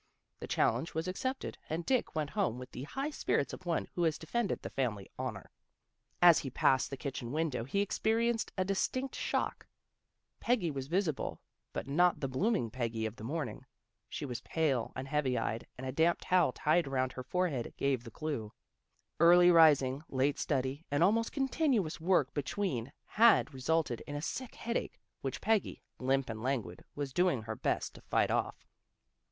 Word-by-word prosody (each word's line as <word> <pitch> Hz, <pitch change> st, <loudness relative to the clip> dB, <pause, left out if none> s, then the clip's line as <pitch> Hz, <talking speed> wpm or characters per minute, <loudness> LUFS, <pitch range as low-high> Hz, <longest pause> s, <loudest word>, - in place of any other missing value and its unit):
The -, -, -6 dB
challenge 125 Hz, +8 st, +1 dB
was 160 Hz, +2 st, -1 dB
accepted, 260 Hz, +8 st, -3 dB
and 165 Hz, +2 st, -2 dB
Dick 255 Hz, -9 st, +1 dB
went 150 Hz, -2 st, -1 dB
home 195 Hz, -, 0 dB
with 125 Hz, 0 st, -9 dB
the 130 Hz, -, -6 dB
high 275 Hz, -, -3 dB
spirits 140 Hz, -, 0 dB
of 185 Hz, -, -9 dB
one 170 Hz, -, 0 dB
who 175 Hz, -, -2 dB
has 160 Hz, -3 st, +2 dB
de -, -, -10 dB
fended 235 Hz, +4 st, -1 dB
the -, -, -5 dB
family 110 Hz, -7 st, -2 dB
honor. -, -, -5 dB, 0.7 s
As 175 Hz, -2 st, +8 dB
he 135 Hz, -, -4 dB
passed 130 Hz, +1 st, +2 dB
the 135 Hz, -, -5 dB
kitchen 130 Hz, -4 st, -5 dB
window 150 Hz, -6 st, -1 dB
he 200 Hz, +10 st, 0 dB
experienced 225 Hz, +3 st, +1 dB
a 185 Hz, -, +1 dB
distinct 255 Hz, +7 st, -1 dB
shock. -, -, -2 dB, 0.7 s
Peggy 220 Hz, -9 st, +1 dB
was 135 Hz, -2 st, -5 dB
visible, 170 Hz, -3 st, -1 dB, 0.3 s
but -, -, -5 dB
not 175 Hz, +5 st, +3 dB
the 135 Hz, -, -1 dB
bloom 190 Hz, -, +1 dB
ing 115 Hz, -, -2 dB
Peggy 115 Hz, -2 st, -2 dB
of 110 Hz, 0 st, -4 dB
the -, -, -9 dB
morning. 145 Hz, +1 st, -4 dB, 0.5 s
She -, -, -4 dB
was 125 Hz, -4 st, -5 dB
pale 140 Hz, -8 st, 0 dB
and 130 Hz, +1 st, -5 dB
heavy 135 Hz, -3 st, 0 dB
eyed 115 Hz, 0 st, -2 dB
and 130 Hz, -, -6 dB
a 130 Hz, -, -2 dB
damp 165 Hz, +5 st, +3 dB
towel 180 Hz, -6 st, +3 dB
tied 155 Hz, +4 st, +2 dB
around 130 Hz, -1 st, 0 dB
her 130 Hz, -, -6 dB
forehead 145 Hz, -3 st, -1 dB
gave 135 Hz, -3 st, 0 dB
the 115 Hz, -, -9 dB
clue. 115 Hz, -5 st, -4 dB, 0.7 s
Early 175 Hz, +2 st, +7 dB
rising, 145 Hz, -5 st, +5 dB
late 135 Hz, +2 st, +1 dB
study, 135 Hz, +2 st, -1 dB
and 145 Hz, +3 st, +2 dB
almost 225 Hz, +5 st, +3 dB
continuous 265 Hz, -, 0 dB
work 165 Hz, -6 st, +2 dB
between 140 Hz, -, -2 dB
had 225 Hz, -7 st, +4 dB
resulted 135 Hz, -1 st, 0 dB
in 145 Hz, -, -5 dB
a 145 Hz, -, -3 dB
sick 255 Hz, +7 st, -4 dB
headache, 235 Hz, 0 st, -3 dB, 0.2 s
which 135 Hz, -1 st, -4 dB
Peggy, 220 Hz, -1 st, 0 dB, 0.2 s
limp 135 Hz, +1 st, +1 dB
and 110 Hz, -1 st, -5 dB
languid, 120 Hz, -9 st, -2 dB
was 140 Hz, -2 st, -4 dB
doing 175 Hz, -9 st, +2 dB
her 110 Hz, 0 st, -4 dB
best -, -, -1 dB
to -, -, -13 dB
fight -, -, +1 dB
off. -, -, -1 dB
150 Hz, 180 wpm, -32 LUFS, 130-180 Hz, 0.7 s, As